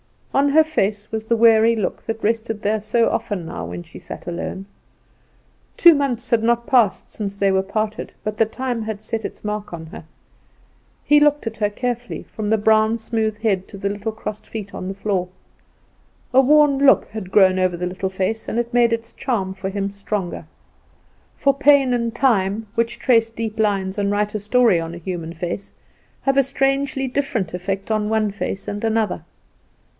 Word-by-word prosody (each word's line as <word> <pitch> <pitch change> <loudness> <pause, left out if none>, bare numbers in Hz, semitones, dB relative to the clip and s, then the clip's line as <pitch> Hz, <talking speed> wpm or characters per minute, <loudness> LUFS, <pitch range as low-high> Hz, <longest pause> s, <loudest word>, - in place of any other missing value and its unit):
On 280 +1 +3
her 315 +3 +6
face 210 -9 -1
was 220 0 -3
the 230 - +2
weary 225 0 +5
look 210 -4 -2
that 225 0 -5
rested 225 0 -1
there 215 +1 +1
so 230 +2 +2
often 190 -5 -2
now 80 - -5
when 85 +1 -6
she - - -13
sat - - -9
alone. 175 +2 -5 1.1
Two 340 -1 +8
months 275 -5 -1
had 230 -2 +3
not 235 +1 +1
passed 235 -6 +2
since 200 -2 -5
they 200 -1 +2
parted; 215 +2 -3
but 215 0 -3
the 225 - +4
time 245 +1 -3
had 215 -1 -5
set 225 0 -3
its - - -7
mark 210 -2 -4
on 165 -1 -7
her. 160 - -10 1.0
He 295 0 +5
looked 295 -1 +3
at 225 0 -4
her 210 -1 +1
carefully, 245 +2 -4
from 210 -1 -5
the 220 - +3
brown, 220 +1 +3
smooth 220 -2 -2
head 200 -4 0
to 200 - -10
the 200 +1 -2
little 205 +2 -4
crossed 215 -1 -7
feet 210 -3 -7
on 185 - -5
the 195 - -3
floor. 195 -3 -1 1.1
A 265 - +7
worn 290 0 +4
look 275 -1 +5
had 210 -4 -7
grown 185 -2 +5
over 185 -1 +1
the 180 - -3
little 185 +1 -3
face, 190 +4 -2
and - - -3
it 235 0 -2
made 240 -1 +4
its 230 0 -3
charm 195 -7 -2
for 190 0 -5
him 200 0 -2
stronger. 200 -2 -4 0.9
For 275 - +2
pain 275 -2 +4
and 235 -1 -1
time, 215 -4 +1
which 230 +1 0
trace 230 -3 +3
deep 225 -1 -5
lines 200 -2 0
and 200 0 +1
write 205 +1 0
a 215 - -2
story 215 -2 +3
on 165 +1 -5
a - - -7
human 170 -1 -5
face, 175 +3 -5 0.5
have 270 0 +1
a 275 - +6
strangely 270 0 0
different 250 - -2
effect 195 +3 -3
on 215 -1 0
one 220 -2 +1
face 200 0 -4
and 205 +1 -4
another. 225 -1 0
220 Hz, 190 wpm, -21 LUFS, 195-235 Hz, 1.1 s, Two